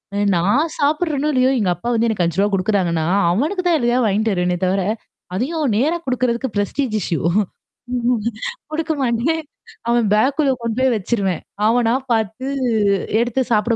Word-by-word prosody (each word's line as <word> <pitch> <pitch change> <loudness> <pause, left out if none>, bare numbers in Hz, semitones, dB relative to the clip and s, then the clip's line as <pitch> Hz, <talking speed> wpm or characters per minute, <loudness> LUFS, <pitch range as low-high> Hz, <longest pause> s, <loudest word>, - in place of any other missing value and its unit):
அ - - -1 0.2
நான் 225 - +2
சாப்படுறேனும் 300 0 +1
இல்லையோ! 255 0 +3
எங்க 200 -4 +1
அப்பா 175 +7 -8
வந்து 230 0 +2
எனக்கு 210 -5 0
ரூ.5 195 +5 +1
குடுக்குறாங்கன்னா, 185 -4 +1 0.3
அவனுக்கு 310 - 0
தான் 335 -2 +4
எதையோ 240 -1 +1
வாங்கிட்டு 215 +1 +1
வருவேனே 180 0 0
தவிர, 190 +1 +1 0.5
அதையும் 285 - -1
நேரா 310 +8 +2
குடுக்குறதுக்கு 255 -1 -1
ஃப்ரெஸ்டிஜ் 215 +4 -1
இஸ்யூ 165 -2 -1 0.8
ம் 245 -1 +1 0.5
குடுக்க 320 +1 -1
மாட்டேன். 260 +6 +1 0.5
அவன் 235 -1 +3
பேக்குள்ள 275 +6 +2
கொண்டு 230 -1 -3
போய் 260 -1 +3
வச்சுருவேன். 195 -4 -1 0.2
அவனா 235 +1 +3 0.2
பாத்து 220 +3 -1 0.7
எடுத்து 240 +2 0
சாப்பிட 220 +2 +2
235 Hz, 145 wpm, -20 LUFS, 205-270 Hz, 0.8 s, தான்